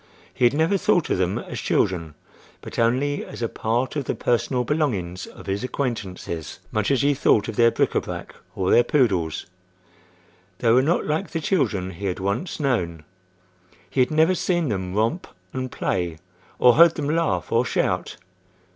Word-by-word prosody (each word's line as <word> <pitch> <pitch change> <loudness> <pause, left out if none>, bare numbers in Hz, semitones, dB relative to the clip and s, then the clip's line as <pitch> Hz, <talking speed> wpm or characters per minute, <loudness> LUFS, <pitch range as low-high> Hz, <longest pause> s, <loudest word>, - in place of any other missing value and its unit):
He 125 - +2
had 120 - +4
never 165 +6 +2
thought 175 -2 +2
of - - +1
them 95 +1 0
as - - -6
children, 85 -5 0 0.5
but - - -7
only 130 +5 +1
as - - -7
a - - +1
part 120 +6 -1
of 145 -3 -2
the - - -2
personal 125 +1 0
belongings 105 - -1
of - - -13
his 100 +4 -2
acquaintances—much 105 - -4
as 135 -3 +2
he 145 +1 +4
thought 115 -6 +2
of - - -5
their 115 -1 +5
bric - - +1
à - - +1
brac - - -7 0.2
or 95 -1 0
their 120 - +6
poodles. 100 - +1 1.1
They 115 +1 +2
were 125 +3 +6
not 160 +6 +1
like 155 +6 -1
the 165 - -3
children 115 - 0
he 95 +3 -5
had 90 - -2
once 100 - -2
known. 90 - -1 0.9
He - - -2
had 125 - +4
never 160 +3 +3
seen 175 -4 0
them 95 -3 -3
romp 115 - 0 0.3
and 130 -1 -4
play 85 -3 -2 0.4
or 125 -1 +6
heard 165 +3 +6
them 145 -3 -3
laugh 165 -1 0
or 115 +1 +3
shout. 120 - -1
120 Hz, 175 wpm, -23 LUFS, 95-145 Hz, 1.1 s, their